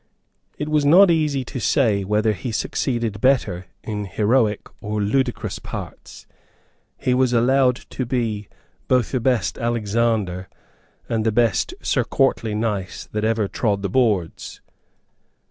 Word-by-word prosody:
It 150 Hz, -, -3 dB
was 155 Hz, -1 st, +2 dB
not 175 Hz, +6 st, +7 dB
easy 150 Hz, -5 st, +1 dB
to 130 Hz, -, -6 dB
say 110 Hz, -4 st, +2 dB
whether 105 Hz, +2 st, +1 dB
he 110 Hz, +5 st, -5 dB
succeeded 115 Hz, -2 st, -2 dB
better 100 Hz, -9 st, +1 dB, 0.2 s
in 105 Hz, -2 st, -4 dB
heroic 110 Hz, +2 st, +1 dB, 0.2 s
or 105 Hz, +1 st, -3 dB
in 100 Hz, 0 st, 0 dB
ludicrous 130 Hz, 0 st, -1 dB
parts. -, -, -9 dB, 0.7 s
He 125 Hz, -, 0 dB
was 125 Hz, -1 st, +2 dB
allowed 125 Hz, +2 st, +3 dB, 0.2 s
to 130 Hz, -, -3 dB
be 115 Hz, -5 st, -2 dB, 0.4 s
both 125 Hz, -4 st, +2 dB
the 130 Hz, -, 0 dB
best 125 Hz, -1 st, 0 dB
Alexander 110 Hz, -5 st, -1 dB, 0.6 s
and 110 Hz, -1 st, -1 dB
the 110 Hz, -, +2 dB
best 110 Hz, -6 st, +1 dB
Sir -, -, +1 dB
Courtly 110 Hz, -2 st, 0 dB
Nice 105 Hz, -4 st, -3 dB
that 105 Hz, 0 st, -2 dB
ever 110 Hz, -2 st, +1 dB
trod 100 Hz, -2 st, -1 dB
the 100 Hz, -, -1 dB
boards. 105 Hz, -7 st, 0 dB
115 Hz, 140 wpm, -22 LUFS, 105-130 Hz, 0.7 s, not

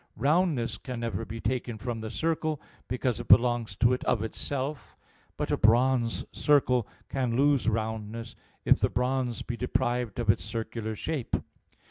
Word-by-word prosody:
Roundness 145 Hz, -, +1 dB
can 125 Hz, -3 st, -6 dB
never 115 Hz, -1 st, -2 dB
be 115 Hz, +1 st, -6 dB
taken 120 Hz, 0 st, -2 dB
from 115 Hz, 0 st, -4 dB
the 110 Hz, -, -4 dB
circle, 155 Hz, +2 st, -1 dB, 0.3 s
because 125 Hz, -1 st, -1 dB
it 120 Hz, -, -6 dB
belongs 115 Hz, -2 st, +4 dB
to 120 Hz, +5 st, +4 dB
it 125 Hz, -, -2 dB
of 110 Hz, -, +1 dB
itself; 135 Hz, +4 st, -4 dB, 0.4 s
but -, -, -2 dB
a -, -, +2 dB
bronze 120 Hz, +1 st, +3 dB
circle 125 Hz, -6 st, +3 dB, 0.2 s
can 125 Hz, -4 st, -1 dB
lose 140 Hz, -2 st, +3 dB
roundness, 110 Hz, 0 st, -3 dB, 0.3 s
if -, -, +5 dB
the -, -, +2 dB
bronze 125 Hz, -1 st, -1 dB
be 120 Hz, -, -4 dB
deprived 120 Hz, -2 st, -1 dB
of 115 Hz, -3 st, +4 dB
its -, -, -4 dB
circular 110 Hz, -1 st, -4 dB
shape. 145 Hz, +2 st, -2 dB
120 Hz, 155 wpm, -28 LUFS, 115-130 Hz, 0.4 s, if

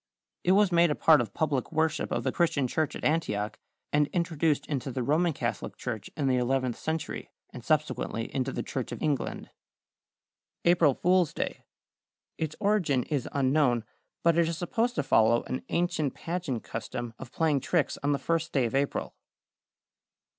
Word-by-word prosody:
It 180 Hz, -, +4 dB
was 200 Hz, -1 st, +4 dB
made 170 Hz, 0 st, +5 dB
a 150 Hz, -, +1 dB
part 155 Hz, -4 st, +5 dB
of 110 Hz, -4 st, -4 dB
public 140 Hz, -2 st, -1 dB
worship 160 Hz, -1 st, 0 dB
of -, -, -1 dB
the -, -, 0 dB
Christian 165 Hz, -6 st, +1 dB
church 155 Hz, +4 st, -1 dB
at -, -, -7 dB
Antioch, 105 Hz, -10 st, 0 dB, 0.3 s
and 150 Hz, 0 st, +4 dB
introduced 165 Hz, -3 st, 0 dB
into 135 Hz, -2 st, -3 dB
the 125 Hz, 0 st, -2 dB
Roman 160 Hz, +7 st, +2 dB
Catholic 120 Hz, -5 st, -4 dB
Church 110 Hz, -4 st, -5 dB
in 145 Hz, -, 0 dB
the 130 Hz, -1 st, +3 dB
eleventh 125 Hz, -1 st, 0 dB
century, 160 Hz, -1 st, -3 dB, 0.2 s
and -, -, -9 dB
subsequently 115 Hz, 0 st, -1 dB
into 130 Hz, -2 st, -1 dB
the -, -, -3 dB
Church -, -, -4 dB
of -, -, -5 dB
England. 150 Hz, -3 st, -2 dB, 1.1 s
=April 170 Hz, -6 st, +5 dB
Fool's 180 Hz, -2 st, +2 dB
Day.= -, -, -4 dB, 0.7 s
Its 155 Hz, -1 st, -2 dB
origin 195 Hz, -, +2 dB
is 140 Hz, -5 st, -1 dB
unknown, 130 Hz, -3 st, +2 dB, 0.4 s
but 170 Hz, 0 st, +4 dB
it 170 Hz, -, +4 dB
is 165 Hz, -, -3 dB
supposed 230 Hz, +8 st, 0 dB
to 145 Hz, -, 0 dB
follow 115 Hz, -2 st, +4 dB
an 130 Hz, -, -4 dB
ancient 170 Hz, -5 st, 0 dB
pageant 165 Hz, -9 st, -3 dB
custom 115 Hz, +1 st, -5 dB
of 130 Hz, -2 st, -9 dB
playing 155 Hz, -4 st, +2 dB
tricks 160 Hz, +3 st, 0 dB
on 145 Hz, 0 st, +1 dB
the 140 Hz, -, +2 dB
first 165 Hz, +1 st, -1 dB
day 135 Hz, -4 st, +2 dB
of 115 Hz, -, -3 dB
April. 140 Hz, +1 st, -1 dB
150 Hz, 170 wpm, -28 LUFS, 130-165 Hz, 1.1 s, made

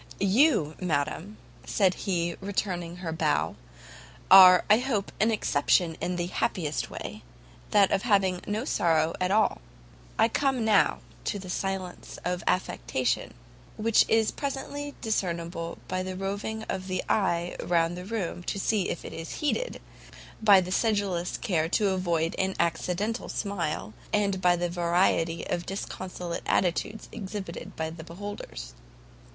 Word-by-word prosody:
"You, 195 Hz, -, +3 dB
madam," 165 Hz, +4 st, -2 dB, 0.3 s
said 190 Hz, -3 st, +2 dB
he, 170 Hz, -3 st, -1 dB
returning 185 Hz, -3 st, -2 dB
her 175 Hz, -2 st, -5 dB
bow, 80 Hz, -, 0 dB, 0.8 s
"are 185 Hz, -2 st, +10 dB
I 210 Hz, +2 st, +6 dB
hope 240 Hz, -6 st, -1 dB
an 220 Hz, -, +4 dB
exception 170 Hz, -4 st, +2 dB
in 180 Hz, -, -1 dB
the 175 Hz, -1 st, -1 dB
happiest 165 Hz, -3 st, -1 dB
way, -, -, -7 dB, 0.5 s
that 200 Hz, -2 st, +4 dB
of 195 Hz, -, +2 dB
having 195 Hz, -5 st, +2 dB
no 215 Hz, +4 st, -1 dB
sorrow 165 Hz, -, +2 dB
at 180 Hz, -, +2 dB
all. 205 Hz, -, +2 dB, 0.6 s
I -, -, +5 dB
come, 260 Hz, -1 st, 0 dB
now, 210 Hz, -3 st, +3 dB, 0.2 s
to -, -, -1 dB
the 185 Hz, -2 st, -7 dB
silence 190 Hz, -1 st, -4 dB
of 180 Hz, 0 st, -1 dB
affectation, 130 Hz, -8 st, 0 dB, 0.4 s
which 225 Hz, +1 st, +4 dB
is 225 Hz, -1 st, +3 dB
presently 285 Hz, +1 st, -4 dB
discernible 170 Hz, -6 st, -2 dB
by 185 Hz, -, -1 dB
the 185 Hz, 0 st, -4 dB
roving 200 Hz, +3 st, -3 dB
of 190 Hz, -3 st, -4 dB
the 185 Hz, -1 st, -2 dB
eye 175 Hz, -4 st, +1 dB
round 170 Hz, 0 st, +1 dB
the 180 Hz, -, -6 dB
room 195 Hz, -4 st, -3 dB
to -, -, -2 dB
see 200 Hz, -1 st, +1 dB
if 170 Hz, -, -4 dB
it -, -, -7 dB
is 165 Hz, 0 st, -6 dB
heeded, 405 Hz, -, -1 dB, 0.6 s
by 205 Hz, -3 st, +7 dB
the 180 Hz, 0 st, -5 dB
sedulous 200 Hz, -5 st, 0 dB
care 165 Hz, -7 st, 0 dB
to 205 Hz, +2 st, +2 dB
avoid 170 Hz, -3 st, 0 dB
an 190 Hz, 0 st, 0 dB
accidental 180 Hz, +7 st, -1 dB
smile, 155 Hz, -, -3 dB, 0.2 s
and 200 Hz, -2 st, +1 dB
by 180 Hz, -1 st, +5 dB
the 175 Hz, 0 st, -1 dB
variety 170 Hz, -1 st, +1 dB
of 175 Hz, -1 st, -3 dB
disconsolate 180 Hz, -3 st, -5 dB
attitudes 180 Hz, +4 st, 0 dB
exhibited 190 Hz, -3 st, -6 dB
to 160 Hz, 0 st, -2 dB
the 160 Hz, 0 st, -9 dB
beholders. 170 Hz, -, -7 dB
185 Hz, 145 wpm, -28 LUFS, 170-205 Hz, 0.8 s, are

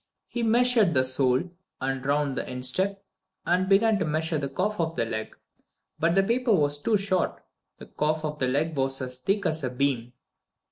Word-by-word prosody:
He 240 Hz, -, -4 dB
measured 230 Hz, -, +3 dB
the 130 Hz, 0 st, +4 dB
sole, 130 Hz, 0 st, +2 dB, 0.4 s
and 135 Hz, 0 st, -2 dB
round 140 Hz, 0 st, 0 dB
the -, -, -4 dB
instep, 185 Hz, +11 st, -1 dB, 0.4 s
and 180 Hz, +2 st, +1 dB
began 210 Hz, +2 st, +4 dB
to 180 Hz, -, 0 dB
measure 155 Hz, +1 st, -1 dB
the 140 Hz, -1 st, -3 dB
calf 195 Hz, +9 st, -2 dB
of 165 Hz, -1 st, -1 dB
the 115 Hz, -, 0 dB
leg, 110 Hz, -1 st, -5 dB, 0.6 s
but 165 Hz, +2 st, +2 dB
the 195 Hz, -, +4 dB
paper 235 Hz, +1 st, +2 dB
was 145 Hz, -3 st, +2 dB
too 215 Hz, +7 st, +2 dB
short. 195 Hz, -2 st, -1 dB, 0.3 s
The -, -, -11 dB
calf 155 Hz, +1 st, -1 dB
of 150 Hz, 0 st, -4 dB
the 130 Hz, -, +1 dB
leg 150 Hz, +5 st, 0 dB
was 135 Hz, 0 st, 0 dB
as 125 Hz, -1 st, -5 dB
thick 195 Hz, +8 st, -1 dB
as 160 Hz, -2 st, 0 dB
a 130 Hz, -, 0 dB
beam. 125 Hz, -2 st, -1 dB
155 Hz, 190 wpm, -26 LUFS, 135-195 Hz, 0.6 s, the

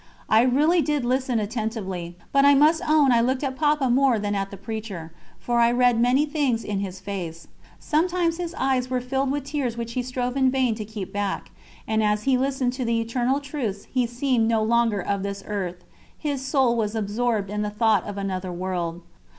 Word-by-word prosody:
I 220 Hz, +1 st, +6 dB
really 295 Hz, +8 st, +3 dB
did 295 Hz, -5 st, 0 dB
listen 255 Hz, -1 st, +1 dB
attentively, 205 Hz, -5 st, -4 dB, 0.2 s
but 275 Hz, 0 st, +4 dB
I 285 Hz, 0 st, +7 dB
must 310 Hz, +4 st, +4 dB
own 300 Hz, -4 st, +5 dB
I 235 Hz, -1 st, +4 dB
looked 255 Hz, +3 st, 0 dB
at 265 Hz, -2 st, -2 dB
Papa 295 Hz, -1 st, +2 dB
more 255 Hz, -1 st, +3 dB
than 205 Hz, -1 st, -2 dB
at 195 Hz, -1 st, -2 dB
the 200 Hz, -, -9 dB
preacher, 195 Hz, -5 st, -6 dB, 0.3 s
for 240 Hz, -1 st, 0 dB
I 235 Hz, 0 st, +5 dB
read 245 Hz, -1 st, +3 dB
many 255 Hz, +5 st, +3 dB
things 285 Hz, -7 st, 0 dB
in 205 Hz, -1 st, -2 dB
his 190 Hz, -1 st, -5 dB
face. 180 Hz, -4 st, -6 dB, 0.3 s
Sometimes 335 Hz, +1 st, 0 dB
his 350 Hz, -1 st, -4 dB
eyes 260 Hz, -1 st, 0 dB
were 255 Hz, -1 st, 0 dB
filled 265 Hz, +2 st, -1 dB
with 285 Hz, 0 st, -1 dB
tears 275 Hz, -5 st, -3 dB
which 235 Hz, 0 st, -4 dB
he 250 Hz, -, 0 dB
strove 250 Hz, 0 st, -3 dB
in 265 Hz, -1 st, +3 dB
vain 255 Hz, -3 st, +1 dB
to 215 Hz, -1 st, -6 dB
keep 210 Hz, -2 st, -7 dB
back; 205 Hz, -1 st, -3 dB, 0.4 s
and 220 Hz, 0 st, +1 dB
as 210 Hz, 0 st, +1 dB
he 270 Hz, -1 st, +3 dB
listened 260 Hz, -1 st, 0 dB
to 255 Hz, 0 st, -3 dB
the 230 Hz, -1 st, +1 dB
eternal 245 Hz, +4 st, 0 dB
truths 265 Hz, -9 st, -4 dB
he 250 Hz, -2 st, +2 dB
seemed 240 Hz, -1 st, +1 dB
no 225 Hz, -1 st, +2 dB
longer 230 Hz, -2 st, +2 dB
of 200 Hz, +2 st, -2 dB
this 200 Hz, 0 st, -4 dB
earth, 180 Hz, -4 st, -4 dB, 0.3 s
his 285 Hz, -4 st, -3 dB
soul 265 Hz, -3 st, +2 dB
was 220 Hz, -1 st, -1 dB
absorbed 215 Hz, -1 st, -1 dB
in 210 Hz, 0 st, -2 dB
the 210 Hz, -, -1 dB
thought 210 Hz, -2 st, +2 dB
of 205 Hz, -1 st, -6 dB
another 190 Hz, -2 st, -3 dB
world. 175 Hz, -1 st, -3 dB
235 Hz, 205 wpm, -24 LUFS, 205-265 Hz, 0.4 s, I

